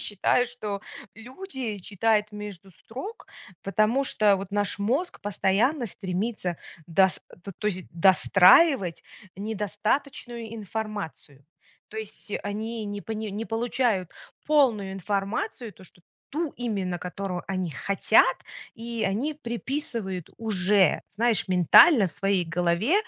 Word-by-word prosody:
считаю, 210 +4 +1
что 210 -5 -5 0.3
люди 250 - -6
читают 210 +2 0
между 200 -3 -9
строк, 320 - -9 0.4
потому 215 +6 +2
что 210 -6 +3
вот 195 0 -7
наш 205 -1 0
мозг 265 - -1
постоянно 210 - +1
стремится 190 -1 -3 0.3
дос 185 0 +3 0.2
то 200 - -7
то 210 - -5
есть 185 -3 -4
достраивать 190 - +5 0.3
недостаточную 220 +4 -3
информацию. 205 - -6 0.4
То 220 - -11
есть 215 -1 -9
они 220 +2 -4
не 205 0 -5
пони 220 0 -5
не 210 +3 -4
получают 225 -5 0 0.4
полную 240 -10 +3
информацию, 205 - -3
то, 190 - -17
что 175 - -17 0.3
ту 315 0 -2
именно, 200 -7 -2
которую 180 0 -4
они 185 -3 -2
хотят, 195 +7 +3 0.4
и 230 0 -4
они 245 +11 -1
приписывают 235 - -4
уже, 200 -3 +2
знаешь, 225 -2 0
ментально 190 - +7
в 170 - -7
своей 195 -2 +1
голове, 175 - +1
210 Hz, 115 wpm, -26 LUFS, 190-235 Hz, 0.4 s, ментально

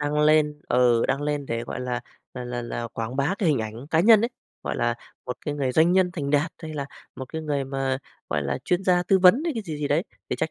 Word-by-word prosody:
đăng 150 +1 0
lên, 150 -1 +3
ừ, 120 -2 +4
đăng 135 +2 0
lên 145 -1 -2
để, 115 -1 -2
gọi 125 - -5
là 125 -1 -2 0.3
là 125 -1 -5
là 120 0 -4
là, 120 0 -4
quảng 115 +2 -5
bá 140 +7 +1
cái 180 - +2
hình 145 - +3
ảnh 110 +4 -5
cá 160 - +4
nhân 215 +3 +7
ấy, 230 - +1 0.3
gọi - - -3
là, 120 0 +1 0.3
một 125 - -3
cái 150 - -1
người 135 -3 -1
doanh 160 +4 +4
nhân 185 -1 +3
thành 145 -5 -3
đạt, 150 +2 +2
hay 155 -1 -6
là 140 -2 -3 0.3
một 130 - -5
cái 160 0 -3
người 145 -3 -1
mà, 135 -1 -1 0.3
gọi 75 - 0
là, 70 -1 -2
chuyên 180 +2 0
gia 180 -1 +4
tư 190 +2 +3
vấn 185 +9 +6
hay 335 - 0
cái 225 - -3
gì 160 -6 -5
gì 145 -1 -2
đấy, 150 +4 +2 0.3
thì - - 0
chắc 160 - -1
145 Hz, 270 wpm, -25 LUFS, 125-160 Hz, 0.3 s, nhân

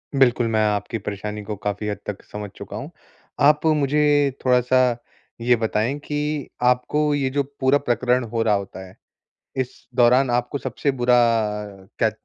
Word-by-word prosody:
बिल्कुल 125 -3 +3
मैं 110 -1 +1
आपकी 105 +2 -1
परेशानी 105 +1 -5
को 105 0 -5
काफ़ी 105 +1 -2
हद 105 - -2
तक 105 -1 -5
समझ 105 -1 -7
चुका - - -8
हूँ। - - -7 0.6
आप 150 +1 +3
मुझे 145 -1 +3
थोड़ा-सा 125 0 +3 0.6
ये 120 +1 +4
बताएँ 110 +4 -1
कि 150 0 -3 0.2
आपको 150 +4 +1
ये 135 -2 0
जो 140 +1 0 0.2
पूरा 130 +1 +4
प्रकरण 125 -1 +1
हो 115 0 -1
रहा 110 - +2
होता 95 -1 -6
है, 90 - -17 0.6
इस 125 -2 -4
दौरान 125 +1 +4
आपको 125 +4 -1
सबसे 130 +2 -2
बुरा 125 -2 +2 0.8
क्या 110 - +3
125 Hz, 155 wpm, -22 LUFS, 110-140 Hz, 0.8 s, ये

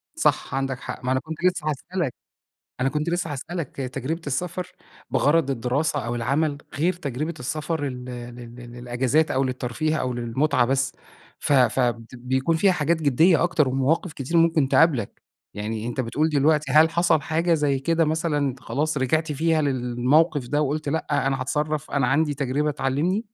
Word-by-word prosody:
صح، - - +1
عندك 135 -1 -2
حق. - - -7
ما 130 - 0
أنا 130 - +2
كنت 160 +4 -8
لسّه 180 -4 +1
هاسألك، 155 0 -3 0.7
أنا 130 +2 +2
كنت 150 +3 -2
لسّه 175 -3 -1
هاسألك 165 +2 -5
تجربة 135 +5 -4
السفر 180 +5 -3 0.4
بغرض 145 0 +2
الدراسة 135 +3 -1
أو 120 +1 -2
العمل 140 +5 0 0.2
غير 170 +5 +1
تجربة 150 0 -4
السفر 155 +4 -3
ال 125 -1 -6
لل 120 -1 -8 0.2
للإجازات 125 +5 0
أو 135 +1 +1
للترفيه 130 +4 -2
أو 130 -3 -1
للمتعة 120 +2 +1
بس. 135 +1 0 0.5
ف 145 - +1
فد 120 -2 +2
بيكون 130 +6 0
فيها 190 +3 +4
حاجات 160 -1 0
جديّة 155 +5 +4
أكتر 165 -5 +2
ومواقف 135 +6 0
كتير 150 +5 -2
ممكن 165 -4 +4
تقابلك، 140 -11 +2 0.3
يعني 110 +2 -4
أنت 120 +2 -2
بتقول 150 +6 0
دلوقتي 150 -1 +2
هل 155 +3 +6
حصل 170 -2 +2
حاجة 165 +4 +1
زي 145 -4 +1
كده 165 +4 +1
مثلًا 160 0 0
أنت 135 -3 -1
خلاص 145 +6 -2
رجعت 150 +4 0
فيها 160 +2 +1
للموقف 130 +2 +1
ده 145 +4 +1
وقلت 150 +1 -1
لأ، 145 -2 0
أنا 135 -1 -1
هاتصرف، 150 +2 -2
أنا 140 -3 +1
عندي 145 +3 +2
تجربة 140 +2 0
تعلمني؟ 150 - -1
145 Hz, 165 wpm, -24 LUFS, 130-160 Hz, 0.7 s, هل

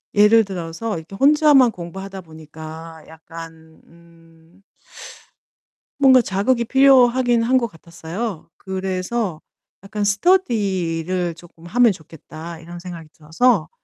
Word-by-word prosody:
예를 215 +2 +6
들어서 180 +2 -5
이렇게 160 +5 -10
혼자만 285 -1 +5
공부하다 190 +2 -8
보니까 160 0 -11
약간 160 0 -12
음 165 +2 -23 1.4
뭔가 260 -2 +6
자극이 235 +4 0
필요하긴 255 -2 +4
한 260 +3 +3
것 235 -2 0
같았어요. 170 +3 -7
그래서 190 0 -3 0.4
약간 210 +1 -4
'스터디를 190 - 0
쪼끔 165 0 -17
하면 235 +5 +3
좋겠다.' 160 0 -10
이런 170 +1 -10
생각이 170 -3 -9
들어서 165 +3 +1
185 Hz, 260 characters per minute, -20 LUFS, 165-230 Hz, 1.4 s, 예를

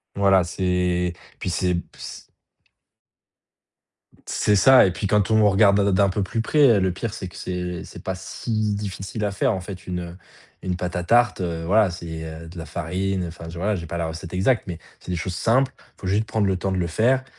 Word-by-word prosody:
Voilà, 95 -2 +4
c'est 90 -1 0 0.3
puis - - -3
c'est 90 +1 +1
b 85 - 0 0.2
s - - -8 2.1
C'est 105 -1 +2
ça 130 +6 +7
et 95 - +3
puis 95 +3 -3
quand 105 +1 +2
on 110 -1 +5
regarde 100 0 +5
d - - +3
d'un 95 +1 +3
peu 100 +2 -1
plus 115 +4 -1
près, 150 - -1
heu, 105 -4 +5
le 95 -1 +1
pire 110 +3 -4
c'est 95 -5 -6
que - - -15
c'est 90 -1 -4
c'est - - -11
pas 95 - -2
si 105 +3 -2
difficile 100 +1 -4
à 100 - +1
faire 100 +2 +1
en 95 - -3
fait, 95 -1 -9
une 90 0 -5 0.4
une 90 -1 -2
pâte 90 0 -3
à 90 - -2
tarte, 120 0 +3
heu, 85 -2 -3
voilà, 100 +2 +4
c'est, 80 -2 -6
heu, 80 +1 -8
de 85 +1 -11
la 80 - -6
farine, 90 +4 -2
enfin, 85 0 -9
tu 85 - -8
vois? 100 +4 0
J'ai 85 -3 -5
pas 85 - -5
la 85 -1 -1
recette 80 +2 -7
exacte 110 +6 +2
mais 85 -3 -5 0.2
c'est - - -9
des 90 - 0
choses 90 +1 -3
simples. 125 +7 +2
Il - - -24
faut - - -4
juste 105 +3 +2
prendre 110 -2 0
le 95 -1 +1
temps 95 0 -1
de - - -1
le 90 -2 0
faire 125 +9 +2
95 Hz, 230 wpm, -23 LUFS, 90-105 Hz, 2.1 s, ça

